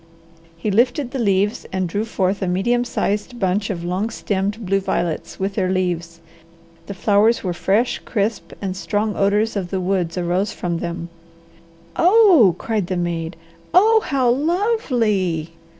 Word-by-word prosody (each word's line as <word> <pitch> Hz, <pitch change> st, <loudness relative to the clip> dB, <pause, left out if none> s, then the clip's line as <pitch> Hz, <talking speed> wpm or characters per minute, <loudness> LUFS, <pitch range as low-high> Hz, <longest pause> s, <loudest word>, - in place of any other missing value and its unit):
He 205 Hz, +5 st, -2 dB
lifted 245 Hz, +5 st, +1 dB
the 270 Hz, -, -3 dB
leaves 200 Hz, -1 st, +1 dB
and 185 Hz, -1 st, -1 dB
drew 205 Hz, +6 st, -2 dB
forth 195 Hz, -3 st, -1 dB
a 190 Hz, -, -1 dB
medium 240 Hz, +7 st, +1 dB
sized 225 Hz, +1 st, -2 dB
bunch 195 Hz, +1 st, 0 dB
of 175 Hz, -4 st, -4 dB
long 185 Hz, +5 st, -1 dB
stemmed 205 Hz, 0 st, -2 dB
blue 195 Hz, +1 st, +2 dB
violets 175 Hz, -4 st, -3 dB
with 195 Hz, +1 st, -1 dB
their 190 Hz, -2 st, 0 dB
leaves. 170 Hz, -3 st, -2 dB, 0.7 s
The 200 Hz, -, -6 dB
flowers 210 Hz, +4 st, +3 dB
were 180 Hz, -2 st, -1 dB
fresh, 205 Hz, +7 st, +1 dB
crisp, 210 Hz, 0 st, -2 dB
and 190 Hz, -1 st, -2 dB
strong 205 Hz, +2 st, -1 dB
odours 210 Hz, +3 st, +1 dB
of 190 Hz, -3 st, -3 dB
the 190 Hz, -, -2 dB
woods 185 Hz, -2 st, -1 dB
arose 180 Hz, +3 st, 0 dB
from 170 Hz, -2 st, -3 dB
them. 170 Hz, 0 st, -5 dB, 0.9 s
"Oh!" 355 Hz, -, +6 dB
cried 215 Hz, -4 st, -2 dB
the 185 Hz, 0 st, -2 dB
maid. 170 Hz, -1 st, -3 dB, 0.4 s
"Oh, 440 Hz, +4 st, +6 dB
how 265 Hz, -3 st, 0 dB
lovely!" 240 Hz, -, 0 dB
200 Hz, 150 wpm, -20 LUFS, 180-230 Hz, 0.9 s, Oh